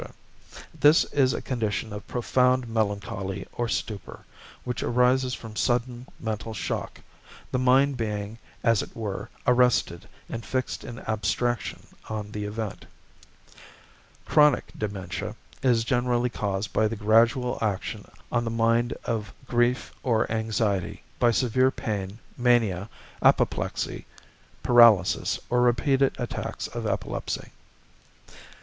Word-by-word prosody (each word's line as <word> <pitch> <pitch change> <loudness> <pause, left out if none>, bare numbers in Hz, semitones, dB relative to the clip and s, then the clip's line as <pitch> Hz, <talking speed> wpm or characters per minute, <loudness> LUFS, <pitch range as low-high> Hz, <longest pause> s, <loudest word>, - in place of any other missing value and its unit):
= - - -16
This 150 +2 +6
is 135 -3 +4
a - - -4
condition 110 -3 -2
of 105 - -8
profound 125 +1 +2
melancholy 100 -3 -2
or 120 -1 -2
stupor, 105 -3 -4 0.4
which 125 -3 -3
arises 125 +1 +2
from 110 -2 -10
sudden 120 +1 -1
mental 110 0 -4
shock, - - -4 0.5
the 130 - 0
mind 130 +2 +4
being, 105 -1 -3 0.2
as 115 -3 +4
it - - -9
were, 105 0 -4 0.2
arrested 125 -8 +2 0.2
and 115 - -5
fixed 130 +1 -3
in 120 -2 -8
abstraction 110 +3 -1 0.2
on 105 -1 -4
the 105 -1 -4
event. 105 0 -5 1.4
=Chronic 150 -3 +4
Dementia= 100 -4 -4 0.3
is 120 -4 +3
generally 120 0 +1
caused 100 -1 -3
by 110 - +3
the 115 - -3
gradual 115 +4 +3
action 105 -4 -3 0.2
on 120 -1 +1
the 115 - -2
mind 115 +1 +2
of 105 -3 -2
grief 120 +1 +1
or 115 -5 +1
anxiety, 110 -4 -1 0.2
by 120 - +5
severe 130 +2 +3
pain, 100 -5 -4 0.2
mania, 115 -6 +2 0.3
apoplexy, - - +1 0.6
paralysis, 115 -7 +5
or 125 0 +3
repeated 130 +3 +3
attacks 120 -2 -4
of - - -4
epilepsy. - - -3
115 Hz, 120 wpm, -26 LUFS, 105-125 Hz, 1.4 s, This